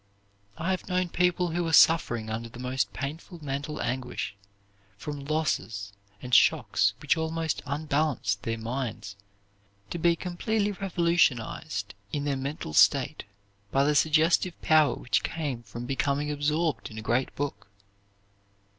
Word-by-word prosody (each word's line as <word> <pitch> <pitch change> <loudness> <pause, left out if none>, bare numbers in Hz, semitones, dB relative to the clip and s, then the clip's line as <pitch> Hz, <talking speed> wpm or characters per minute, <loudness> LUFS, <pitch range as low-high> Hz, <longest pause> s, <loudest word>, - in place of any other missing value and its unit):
I 170 +4 -1
have 185 - -3
known 180 -1 0
people 180 0 +1
who 175 +2 -1
were 165 -1 -2
suffering 120 -10 +5
under 115 +1 -4
the 115 - -12
most 125 -4 -1
painful 150 - -6
mental 140 +2 -3
anguish, 125 -5 -3 0.6
from 145 +5 -6
losses 115 -10 -2 0.3
and 125 0 -7
shocks - - +4
which - - +3
almost 160 -1 -1
unbalanced 145 -8 0
their 115 +1 -2
minds, 115 -3 -4 0.8
to 170 - -3
be 170 +1 +4
completely 200 +5 -1
revolutionized 170 - 0 0.2
in 145 - -2
their 140 -1 0
mental 135 - -4
state - - +4 0.4
by 135 +6 +2
the 150 +1 +3
suggestive 160 +4 +3
power 155 -2 +4
which 125 - 0
came 145 -7 -3
from 120 +2 -8
becoming 140 +3 0
absorbed 150 +2 0
in 110 - -11
a 110 - -5
great 120 +4 0
book. 145 -6 -4
145 Hz, 135 wpm, -28 LUFS, 120-165 Hz, 0.8 s, suffering